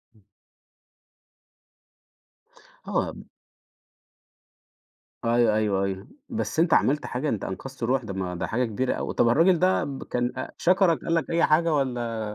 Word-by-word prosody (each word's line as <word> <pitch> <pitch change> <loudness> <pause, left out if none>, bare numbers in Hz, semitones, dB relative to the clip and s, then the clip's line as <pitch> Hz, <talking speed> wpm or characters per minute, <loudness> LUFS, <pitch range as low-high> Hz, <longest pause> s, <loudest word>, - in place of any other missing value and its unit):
امم 105 - -25 2.6
آه. - - -1 2.1
أيوة، 115 -2 +3
أيوة، 100 -3 +1
أيوة، 95 -1 -4 0.2
بس 225 -8 -3
أنت 170 - +3
عملت 145 +2 +2
حاجة، 135 +4 -2
أنت 105 - -2
أنقذت 130 +6 -6
روح، 125 +1 +1
ده 100 -3 -6
ما 90 -2 -3
ده - - -3
حاجة 125 +2 0
كبيرة 120 +4 -1
أوي. - - -4
طب 115 - +3
الراجل 165 +7 +4
ده 185 +1 +2
ب 135 -2 -5
كان 120 0 -2
أ - - -5
شكرك، 180 -2 +3
قال 165 - -1
لك 165 - -1
أي 170 0 +1
حاجة 160 +1 +3
والّا؟ 120 -5 -1
125 Hz, 145 wpm, -25 LUFS, 110-160 Hz, 2.6 s, الراجل